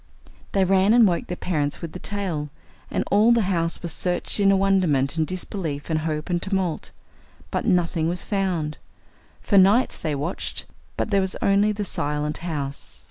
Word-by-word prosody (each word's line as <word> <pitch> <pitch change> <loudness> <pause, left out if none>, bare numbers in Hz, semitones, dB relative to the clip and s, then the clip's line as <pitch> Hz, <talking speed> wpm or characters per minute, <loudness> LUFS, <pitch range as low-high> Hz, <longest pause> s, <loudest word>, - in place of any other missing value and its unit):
They 195 - +3
ran 195 +3 +4
and 235 -3 +7
woke 175 -2 -1
their 180 - -4
parents 150 -5 -1
with 165 -2 -6
the 180 - -8
tale, 180 -8 -3 0.4
and - - -1
all 215 +4 +5
the 235 -2 +4
house 170 -3 -1
was 170 -2 +1
searched 180 +3 0
in 200 -1 +5
a 195 - +4
wonderment, 175 -8 +2
and 160 -1 0
disbelief, 175 -5 -4
and 155 - +1
hope, 155 -1 -3
and 175 -2 -1
tumult! 190 -4 -2 0.6
But - - -2
nothing 170 -4 +1
was 175 +1 -3
found. 180 -7 -2 0.6
For 200 - +4
nights 205 +7 +4
they 155 -2 -2
watched. 150 +6 -3 0.3
But - - -2
there 200 -1 +3
was 190 -1 -2
only 200 +2 +3
the 205 0 -3
silent 150 -2 -2
house. 145 -5 -2
180 Hz, 180 wpm, -24 LUFS, 155-195 Hz, 0.6 s, and